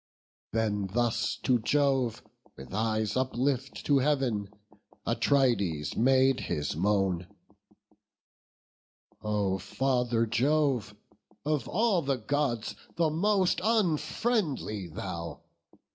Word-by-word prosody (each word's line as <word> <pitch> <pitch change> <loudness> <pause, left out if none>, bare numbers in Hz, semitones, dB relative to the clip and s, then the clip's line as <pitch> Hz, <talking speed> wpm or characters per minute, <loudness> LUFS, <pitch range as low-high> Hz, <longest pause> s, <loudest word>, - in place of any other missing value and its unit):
Then 105 -3 0
thus 120 +4 0
to 125 -2 +3
Jove, 135 -1 +1 0.3
with 65 +6 -10
eyes 110 0 0
uplift 130 +1 -1
to 140 -2 +4
Heav'n, 130 -8 0 0.6
Atrides 100 - +1
made 130 +2 +4
his 75 0 -2
moan: 95 -1 +1 1.9
"O 100 -3 0
Father 120 +3 0
Jove! 125 -2 +1 0.5
Of 150 -4 0
all 210 -3 +2
the 135 -3 0
Gods, 125 -1 -1 0.2
the 165 -2 +2
most 190 +3 +2
unfriendly 180 - 0
thou! 85 0 -6
125 Hz, 90 wpm, -29 LUFS, 105-145 Hz, 1.9 s, to